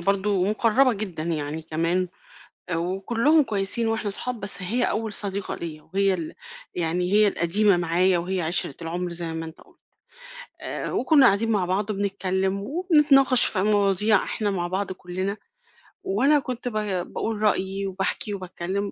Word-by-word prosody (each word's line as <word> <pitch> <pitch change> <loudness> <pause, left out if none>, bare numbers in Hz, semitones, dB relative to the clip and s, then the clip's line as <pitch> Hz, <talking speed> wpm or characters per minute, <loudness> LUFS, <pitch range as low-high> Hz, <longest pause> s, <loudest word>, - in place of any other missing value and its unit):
برضه 195 +1 +1
مُقرّبة 230 +5 +2
جدًا 195 -7 -5
يعني 155 -1 -3
كمان 165 +3 -1 0.7
وكُلّهم 225 - +1
كويسين 215 0 0
وإحنا 225 -2 -1
صحاب، 240 +3 -3
بس 195 0 -3
هي 225 +7 0
أول 220 -2 -2
صديقة 200 -1 -2
ليّا 155 -2 -7
وهي 195 0 +2
ال 165 -4 -5 0.4
يعني 180 +1 -1
هي 210 +1 +5
القديمة 200 +2 +3
معايا 175 +2 +2
وهي 185 +2 -2
عِشْرة 160 -4 0
العُمْر 175 +2 -4
زي 170 -1 -4
ما 165 0 -5
أنت 160 0 -12
قُلت. - - -22 0.8
آآ - - -5
وكُنّا 275 +1 +4
قاعدين 225 +1 +3
مع 200 -4 +1
بعض 195 +4 -1
وبنتكلِّم 195 -1 -2
وبنتناقش 290 - +4
في 190 - +2
مواضيع 205 0 +3
إحنا 210 -2 -2
مع 175 -3 -2
بعض 190 +2 -3
كُلّنا 185 +2 -4 0.7
وأنا 300 -6 +2
كنت 250 -3 -6
با 210 -6 -2
باقول 220 +3 -4
رأيي 195 -2 0
وباحكي 195 +2 -1
وباتكلِّم، 190 +1 -4
195 Hz, 150 wpm, -24 LUFS, 180-215 Hz, 0.8 s, هي